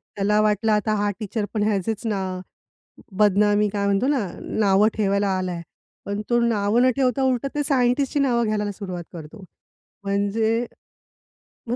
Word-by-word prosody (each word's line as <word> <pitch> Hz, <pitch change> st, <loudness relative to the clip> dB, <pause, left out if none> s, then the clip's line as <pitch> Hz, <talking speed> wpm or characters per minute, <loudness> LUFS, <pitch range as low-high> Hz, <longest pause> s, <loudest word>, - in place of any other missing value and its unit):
त्याला 210 Hz, +1 st, +1 dB
वाटलं 215 Hz, +1 st, +1 dB
आता 210 Hz, +1 st, +1 dB
हा 205 Hz, 0 st, 0 dB
टीचरपण 210 Hz, 0 st, -3 dB
ह्याचेच 215 Hz, +2 st, -1 dB
ना 200 Hz, -3 st, -1 dB, 1.0 s
बदनामी 210 Hz, +1 st, +3 dB
काय 200 Hz, -1 st, -1 dB
म्हणतो 200 Hz, +5 st, +1 dB
ना 265 Hz, -9 st, 0 dB
नावं 205 Hz, 0 st, +2 dB
ठेवायला 200 Hz, -1 st, +1 dB
आलाय. 180 Hz, -2 st, -3 dB, 0.4 s
पण 200 Hz, +1 st, -3 dB
तो 240 Hz, 0 st, +3 dB
नावं 225 Hz, 0 st, +2 dB
न 255 Hz, -, +5 dB
ठेवता 265 Hz, -1 st, +1 dB
उलट 260 Hz, 0 st, +1 dB
ते 295 Hz, -, 0 dB
सायंटिस्टची 275 Hz, +1 st, +1 dB
नावं 245 Hz, -4 st, +2 dB
घ्यायला 210 Hz, -1 st, -1 dB
सुरुवात 185 Hz, -3 st, -6 dB
करतो. 165 Hz, +5 st, -10 dB, 0.6 s
म्हणजे 220 Hz, +4 st, 0 dB, 1.0 s
मग 240 Hz, -, -1 dB
210 Hz, 145 wpm, -23 LUFS, 200-235 Hz, 1.0 s, न